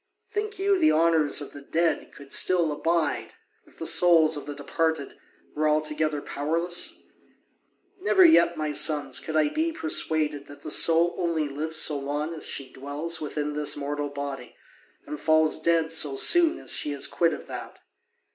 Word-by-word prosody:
Think 420 0 -4
you 390 0 +1
the 310 -2 +4
honours 160 -2 +2
of 145 - -8
the 145 - -10
dead 165 +3 -1
would 140 -1 -9
still 175 -4 +3
abide, 165 +2 -1 0.3
if - - -22
the 165 - -6
souls 165 -1 +5
of 145 - -7
the 145 - -6
departed 160 +1 -2 0.4
were 155 +1 0
altogether 150 -1 -1
powerless? 175 - -2 1.0
Never 380 -2 +4
yet, 320 - +5
my 155 -1 -2
sons, 150 0 0
could 160 - -6
I 155 -1 +3
be 325 +1 -1
persuaded 160 - -2
that 145 - -14
the 155 - -3
soul 170 +3 +4
only 165 -3 -1
lives 155 +3 -4
so 155 -2 +2
long 145 +3 -4
as 160 - -3
she 135 -2 -4
dwells 145 +5 -4
within 150 0 -4
this 150 0 0
mortal 145 0 -4
body, 140 -3 -7 0.5
and 300 - -7
falls 155 0 +2
dead 165 -1 +1
so 150 -4 +2
soon 335 - +5
as - - -3
she 145 - 0
is 140 - -1
quit 170 -1 +1
of - - -7
that. - - -9
155 Hz, 170 wpm, -25 LUFS, 145-170 Hz, 1.0 s, souls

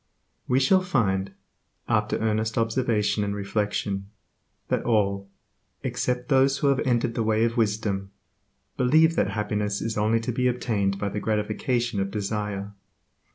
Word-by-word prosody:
We 125 - +3
shall 185 +8 +4
find, 100 - 0 0.6
after 105 -2 +1
earnest 110 0 -1
observation 115 -2 +1
and 100 0 -2
reflection, 100 -1 -2 0.6
that - - +1
all, 100 -3 +1 0.5
except 125 0 -2
those 135 -1 +3
who 140 0 +2
have 140 -1 +2
entered 120 -3 +1
the 115 - -1
way 110 0 +2
of 115 0 +1
wisdom, 105 -3 0 0.7
believe 160 +6 +4
that - - +1
happiness 105 -1 -1
is 110 -2 -2
only 110 +2 +2
to 115 - -2
be 125 +2 +1
obtained 105 -6 0
by 100 0 -2
the 105 - -3
gratification 110 +2 -1
of 95 0 -1
desire. 105 -1 -3
110 Hz, 145 wpm, -25 LUFS, 105-125 Hz, 0.7 s, shall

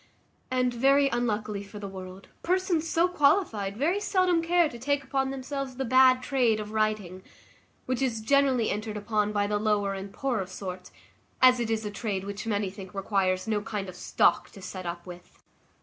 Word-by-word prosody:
And, 255 -1 +1
very 275 +3 +4
unluckily 215 -4 -1
for 200 +1 -11
the 205 -1 -6
world, 190 0 -9
persons 355 -2 0
so 335 +2 +3
qualified 280 - +1
very 335 - +1
seldom 370 -4 +2
care 345 0 +3
to 240 -5 -9
take 285 +3 0
upon 270 0 -1
themselves 270 0 -5
the 265 +1 -2
bad 255 +1 +5
trade 245 -6 +2
of 210 0 -6
writing; 215 -4 -1 0.6
which 255 0 -2
is 245 -4 0
generally 260 0 +2
entered 210 +1 -4
upon 210 0 0
by 205 -1 +1
the 205 0 0
lower 205 -2 +1
and 195 0 -6
poorer 240 -8 -2
sort, 185 -1 -7 0.5
as 255 -1 +6
it 235 -2 -1
is 220 -1 -1
a 210 - -3
trade 200 -2 -3
which 200 +2 -6
many 205 -3 -1
think 190 -1 -11
requires 195 -1 0
no 215 -2 0
kind 205 -2 -4
of 185 - -8
stock - - +2
to - - -12
set 185 -2 -6
up 175 0 -5
with. 180 -1 -13
220 Hz, 185 wpm, -27 LUFS, 200-270 Hz, 0.6 s, as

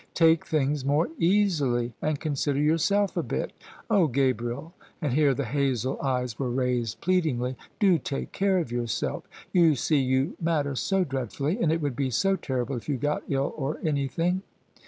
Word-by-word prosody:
"Take 165 -1 +4
things 145 -2 0
more 145 +5 +2
easily, 155 - +2
and 155 -2 0
consider 145 -2 -1
yourself 165 +7 +2
a - - +1
bit. - - -3 0.3
Ohl 200 -7 +4
Gabriel," 130 +3 -1 0.3
and 150 -7 -1
here 140 -1 +3
the 140 - -2
hazel 130 0 0
eyes 125 -4 -1
were 130 -2 -1
raised 125 -3 -1
plead 185 -1 +2
ingly, 125 -3 -1 0.2
"do 190 -6 +4
take 135 - -4
care 195 -1 +2
of 165 -9 -2
yourself: 120 -2 -2 0.3
you 165 -4 +5
see, 145 +3 +2
you 130 +4 +1
matter 155 -4 0
so 190 +8 +1
dreadfully, 140 - -2
and 160 - +3
it 165 0 0
would 145 -4 -1
be 135 +1 0
so 195 - +2
terrible 130 -5 -2
if 120 - -8
you 140 - +1
got 145 +4 -1
ill 135 0 0
or 145 +1 -3
anything." 160 +4 0
140 Hz, 175 wpm, -27 LUFS, 130-165 Hz, 0.3 s, you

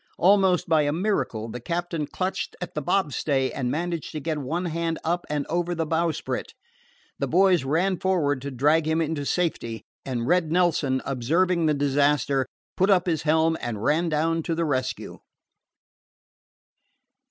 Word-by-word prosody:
Almost 190 -1 +4
by 160 -2 +4
a 145 -1 +1
miracle, 145 - -1
the 120 +2 -6
captain 170 +2 -3
clutched 185 +5 -3
at 180 - -6
the 150 - -2
bobstay 140 -5 0
and 125 -3 -2
managed 170 +2 -3
to 155 - -3
get 155 0 -2
one 160 +7 -2
hand 165 -1 -2
up 175 +2 -1
and 150 -1 -1
over 175 +1 -1
the 165 -1 -1
bowsprit. 165 0 -2 0.6
The - - 0
boys 185 -4 +4
ran 170 +7 +1
forward 150 -8 +1
to 140 - -4
drag 150 +5 +2
him 160 +1 +1
into 155 -3 -1
safety, 135 -10 -1 0.2
and 120 -3 -3
Red 170 +1 +2
Nelson, 165 -7 +2
observing 165 +7 +1
the 150 - +2
disaster, 140 -1 +2 0.3
put 190 +2 +2
up 185 -3 +4
his 165 -4 0
helm 160 +1 +2
and 115 -3 -4
ran 165 +6 +2
down 165 +2 +1
to 165 +1 -2
the 170 0 0
rescue. 130 -4 -2
160 Hz, 160 wpm, -25 LUFS, 140-175 Hz, 0.6 s, Almost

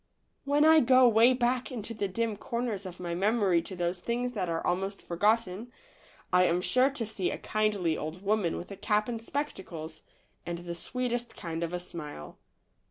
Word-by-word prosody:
AYhen 290 +2 +4
I 320 0 +8
go 255 -1 +6
way 230 +2 +6
back 250 0 0
into 230 -2 -5
the 205 -2 -2
dim 225 +3 -1
corners 220 -2 -3
of 180 -1 -10
my 175 -1 -3
memory 195 -2 +2
to 185 +3 -8
those 175 0 -1
things 245 +5 -2
that 185 -6 -2
are 165 0 -2
almost 195 +3 -2
forgotten, 210 +4 +1 0.6
I 180 0 +6
am 175 0 +2
sure 255 +8 +3
to 270 -5 -4
see 205 -4 -2
a - - -3
kindly 210 -6 0
old 155 +5 -6
woman 205 -4 +1
with 180 - -8
a 200 - -7
cap 210 +1 +1
and 230 -2 -4
spectacles, 185 - -5 0.4
and 170 0 -4
the 170 0 -6
sweetest 240 +6 -3
kind 165 -1 -4
of 170 -1 -2
a 180 - -2
smile. 150 - -7
205 Hz, 185 wpm, -29 LUFS, 175-235 Hz, 0.6 s, I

